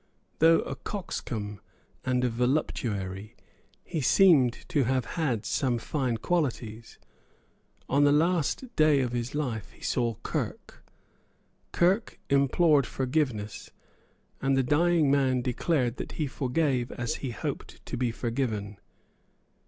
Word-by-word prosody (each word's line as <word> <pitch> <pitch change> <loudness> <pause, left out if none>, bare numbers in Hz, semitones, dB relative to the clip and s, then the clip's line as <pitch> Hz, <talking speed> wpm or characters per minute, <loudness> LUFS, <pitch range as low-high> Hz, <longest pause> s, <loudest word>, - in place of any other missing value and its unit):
Though 165 +1 +6
a 135 - -5
coxcomb 110 - -5 0.4
and 125 -1 +1
a 125 - +2
voluptuary, 110 -5 -2 0.5
he 160 - -3
seems 140 -5 +4
to 140 -4 +2
have 130 0 +1
had 130 -10 -1
some 125 -4 0
fine 125 -1 -1
qualities. 115 -7 -2 0.9
On 140 +2 +3
the 145 - +5
last 170 - +1
day 155 -3 +4
of 125 -2 -1
his 120 +2 -3
life 115 -9 -2
he - - -21
saw 120 -3 0
Kirke. - - -4 0.9
Kirke 185 +6 +1
implored 140 +1 +4
forgiveness; 130 -6 -2 0.7
and 135 0 +2
the 135 - +3
dying 155 +2 +3
man 130 -3 +2
declared 125 -1 0
that - - -6
he 155 - -1
forgave 130 -2 0
as 120 -1 -3
he 135 - -4
hoped 115 - -6
to - - -4
be 125 -1 0
forgiven. 115 -4 -3
130 Hz, 125 wpm, -28 LUFS, 120-150 Hz, 0.9 s, Though